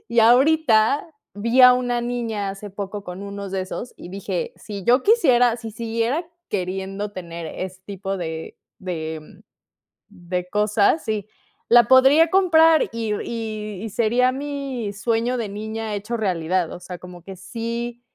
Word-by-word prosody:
Y 235 0 -1
ahorita 255 +1 +4 0.3
vi 230 +5 +2
a 250 - +10
una 245 -1 0
niña 230 -4 -2
hace 200 +1 -8
poco 200 +1 -6
con 180 +2 -7
unos 200 -1 -6
de 190 -1 -1
esos, 230 +6 -7
y - - -10
dije: 470 - -4
"Si 200 -3 -8
yo 250 +4 +4
quisiera, 250 - +4
si 225 -1 -7
siguiera 230 +8 -2 0.2
queriendo 195 +1 -3
tener 170 -3 -7
ese 185 +3 -6
tipo 195 -1 -4
de 160 -3 -6 0.2
de 160 -1 -6 0.7
de 180 -2 -5
cosas, 210 +8 +2
sí, 215 -3 -2 0.4
la 240 0 +7
podría 270 +5 +6
comprar, 325 -4 +5
y 225 -2 -2
y 215 -3 -5
y 225 - -4
sería 235 +4 +2
mi 275 -5 -4
sueño 230 +4 0
de 225 -3 -3
niña 220 +1 -5
hecho 210 +4 -3
realidad. 180 -3 0
O - - -8
sea, 180 0 -8
como 180 -1 -12
que 195 +3 -9
sí 235 +5 -5
215 Hz, 150 wpm, -22 LUFS, 195-245 Hz, 0.7 s, a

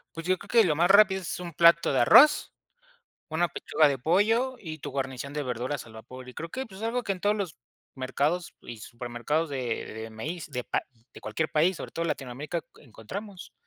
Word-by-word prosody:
Pues, 165 0 -6
yo 185 0 +2
creo - - -13 0.2
que, - - +1
lo 155 -4 +1
más 175 +3 +3
rápido 195 -1 +6
es 180 0 -5
un 175 - -6
plato 170 +1 +5
de 135 - +2
arroz, 280 - +6 0.8
una 170 +2 +1
pechuga 155 -1 +2
de 140 -1 0
pollo 220 - +2
y 160 -4 -7
tu 145 - -6
guarnición 135 0 -4
de 150 0 -3
verduras 125 +3 -3
al 110 - -14
vapor. 125 +3 -11
Y 125 - -10
creo 165 +1 -6
que, 265 +6 -4
pues, 195 -3 -12
algo 235 +2 -1
que 200 - -1
en 185 - -11
todos 210 +1 +2
los 185 -6 -4 0.4
mercados 145 +7 -1
y 120 - -9
supermercados 120 +8 -3
de 125 -4 -3
de 110 +1 -7
maíz 155 +11 -6
de 125 -2 -4
pa - - -1 0.3
de - - -12
cualquier 110 +9 -2
país, 170 +4 +2
sobre - - -7
todo 165 - -3
Latinoamérica, 145 +2 -3 0.2
encontramos. 180 - -9
155 Hz, 205 wpm, -27 LUFS, 130-185 Hz, 0.8 s, rápido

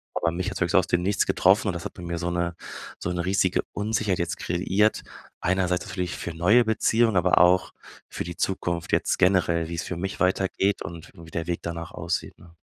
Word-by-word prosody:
aber 85 - +1
mich 90 +2 -2
hat's - - -6
wirklich - - +1
so - - +7
aus - - -1
dem 90 0 +1
Nichts 100 +2 +1
getroffen 100 +3 +3
und 95 - 0
das 85 - -6
hat - - -5
bei - - -11
mir 85 0 -3
so 85 0 -2
'ne 85 0 -1 0.4
so 90 - -3
'ne 90 -1 -2
riesige 95 -1 +2
Unsicherheit 105 -2 0
jetzt 85 +1 -2
kreiert. 95 +5 +1 0.4
Einerseits 90 -1 0
natürlich 90 -1 -3
für 85 - -5
neue 100 +9 +4
Beziehungen, 110 0 +2
aber 90 +1 +3
auch 90 +1 +4 0.4
für - - -4
die 85 0 -6
Zukunft, 85 -3 -2
jetzt - - +1
generell, 85 -3 +2
wie's 85 -1 -3
für 90 - -4
mich 95 +3 -4
weitergeht 95 +2 +1
und 85 0 -9
wie 85 -1 -12
der 80 -1 -3
Weg 85 -1 -1
danach 85 -1 -5
aussieht, - - -3
ne? 85 -1 -17
90 Hz, 215 wpm, -25 LUFS, 85-95 Hz, 0.4 s, so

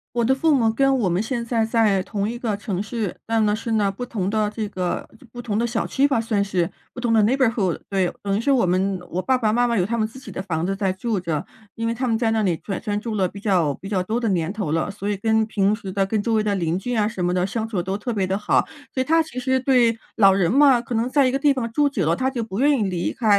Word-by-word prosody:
我 235 - +2
的 260 +3 +3
父 310 +3 +2
母 230 -5 +3
跟 270 +4 +2
我 195 -6 +1
们 175 +3 +1
现 235 +1 -2
在 230 -1 0
在 220 -5 +2
同 205 0 -2
一 240 - -4
个 225 -4 -2
城 200 -2 -3
市， 215 -3 -3
但 225 -1 +1
呢 210 - +2
是 225 +1 -5
那 210 -3 +2
不 200 +6 -5
同 200 -6 -2
的 215 0 +1
这 215 -1 -4
个 180 -3 -3 0.2
不 240 - -7
同 215 -4 -2
的 235 - +1
小 235 -1 -2
区 275 +1 +2
吧 270 -5 +1
算 220 -3 0
是， 180 -4 -1 0.2
不 245 - -7
同 240 -2 0
的 220 -2 +4
neighborhood。 225 -6 +1
对， 190 -3 0
等 200 0 -1
于 - - -1
是 280 +5 +1
我 260 -3 +3
们 185 +1 +1
我 175 - -2
爸 260 +7 +2
爸 220 -3 +2
妈 245 +2 +2
妈 235 - 0
有 190 - +2
他 230 +6 -1
们 215 -1 +1
自 240 +4 -12
己 - - -11
的 - - -6
房 165 -4 -2
子 195 - -1
在 195 -2 0
住 210 +2 -2
着， 165 -4 -2 0.3
因 230 0 -3
为 230 - -1
他 255 +2 -2
们 225 - +2
在 225 0 +1
那 220 -1 +1
里 180 -4 +1
转 195 +1 -5 0.2
住 225 -1 -4
了 190 -2 +2
比 200 - -10
较 180 -8 +1
比 195 - -9
较 190 -3 0
多 220 +6 -1
的 230 -2 0
年 175 -1 0
头 205 -8 -3
了， 165 +5 0
所 200 0 -5
以 205 - -1
跟 220 +2 +2
平 205 -1 +1
时 200 -4 -7
的 195 0 +1
跟 210 +2 -1
周 230 +2 -1
围 215 - +2
的 205 - 0
邻 170 -3 0
居 245 +6 -3
啊 210 -2 +2
什 190 -5 -3
么 175 - +1
的， 180 0 +1
相 220 +2 -3
处 205 -6 -2
都 190 +3 -3
特 235 +3 -4
别 195 -3 0
地 190 +1 0
好。 210 - +1 0.3
所 260 - 0
以 - - +2
他 325 +4 +3
其 305 -5 -7
实 260 +1 +1
对， 245 -3 +3 0.2
老 195 -3 +7
人 190 -2 +2
嘛， 275 -1 +6
可 235 +1 -6
能 230 +3 0
在 280 0 +3
一 255 - +2
个 270 - -1
地 290 0 +4
方 235 -4 -3
住 290 +4 +2
久 210 - -1
了， 165 - +3
他 260 +5 0
就 245 -4 -3
不 210 0 -5
愿 285 -1 +3
意 - - +1
离 180 -3 -1
开。 220 -5 +2
220 Hz, 350 characters per minute, -22 LUFS, 195-240 Hz, 0.3 s, 老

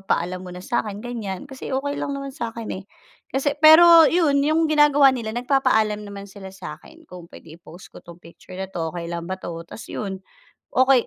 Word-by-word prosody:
magpaalam 185 -1 -2
muna 180 0 -9
sa'kin 210 -4 -2
ganyan, 215 -6 -5
kasi 270 -1 -9
okey 285 +2 -2
lang 280 - -3
naman 275 -1 -6
sa'kin, 230 -2 -6
eh. 195 - -16 0.5
Kasi 275 +2 -1
pero 325 +1 +8
'yun, 315 -5 +2
'yung 310 +3 +2
ginagawa 290 -2 +5
nila 230 -3 -4
nagpapaalam 240 -5 +1
naman 200 -1 -9
sila 195 -1 -11
sa'kin, 190 - -12
"Kung 175 -2 -12
pwede 160 -1 -13
i-post 170 +1 -14
ko - - -12
'tong 170 0 -13
picture 170 +2 -14
na 190 - -3
'to, 165 -3 -3
okey 170 -1 -5
lang 170 0 -5
ba 190 - -2
'to?" 170 - -7
'tas 215 - -10
'yun, 195 -2 -5 0.6
okey, 260 -1 +4
225 Hz, 190 wpm, -22 LUFS, 185-280 Hz, 0.6 s, pero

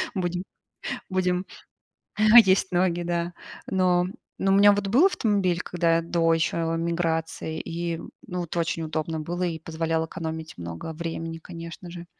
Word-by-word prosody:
Будем, 180 -1 -1 0.7
будем. 185 0 0 1.0
Есть 190 0 +2
ноги, 175 -1 +2
да. 175 0 -1 0.3
Но 180 -1 +2 0.3
но, 195 - +1
у - - +5
меня 205 0 +8
вот 200 -1 -1
был 265 - +6
автомобиль, 200 - +1
когда 170 -1 +1
до 165 0 +2
еще 165 +1 0
эмиграции, 165 -1 -1
и 170 0 -3 0.3
ну 180 -1 -3
это 170 +1 -4
очень 165 0 -1
удобно 155 0 -2
было 175 +3 -3
и 165 -2 -2
позволял 165 0 -1
экономить 160 - -6
много 85 - -6
времени, 165 0 -5
конечно 170 +1 -9
же. 175 0 -8
170 Hz, 145 wpm, -26 LUFS, 165-180 Hz, 1.0 s, меня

